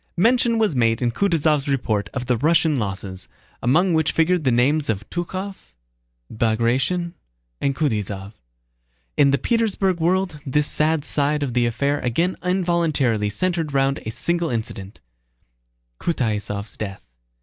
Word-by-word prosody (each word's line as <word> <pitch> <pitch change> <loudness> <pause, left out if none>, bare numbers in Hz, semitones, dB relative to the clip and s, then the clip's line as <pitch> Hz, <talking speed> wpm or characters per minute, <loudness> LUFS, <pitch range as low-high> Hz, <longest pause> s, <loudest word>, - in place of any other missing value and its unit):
Mention 235 +4 +3
was 215 -9 +1
made 115 -2 +2
in 120 -2 0
Kutúzov's 155 -2 +1
report 110 -7 -1
of 130 -2 -4
the 125 - +1
Russian 160 +4 +2
losses, 95 -4 -4 0.3
among 170 +9 +3
which 160 -1 +1
figured 170 +1 +2
the 130 - +4
names 140 +5 +2
of 105 -1 -2
Túchkov, 185 - -5 0.6
Bagratión, 120 +10 0 0.5
and 140 -1 0
Kutáysov. 105 -8 -2 0.8
In 140 -1 +5
the 140 - +3
Petersburg 200 - 0
world 180 -1 0
this 150 +1 +1
sad 155 0 +2
side 145 0 +1
of 130 -4 -3
the 120 -1 +2
affair 140 +5 0
again 165 +10 0
involuntarily 165 - +1
centered 165 - -1
round 135 0 +2
a - - -7
single 170 +8 -1
incident: 110 -4 -5 1.0
Kutáysov's 105 -8 -2
death. 100 -2 -6
140 Hz, 135 wpm, -22 LUFS, 115-170 Hz, 1.0 s, In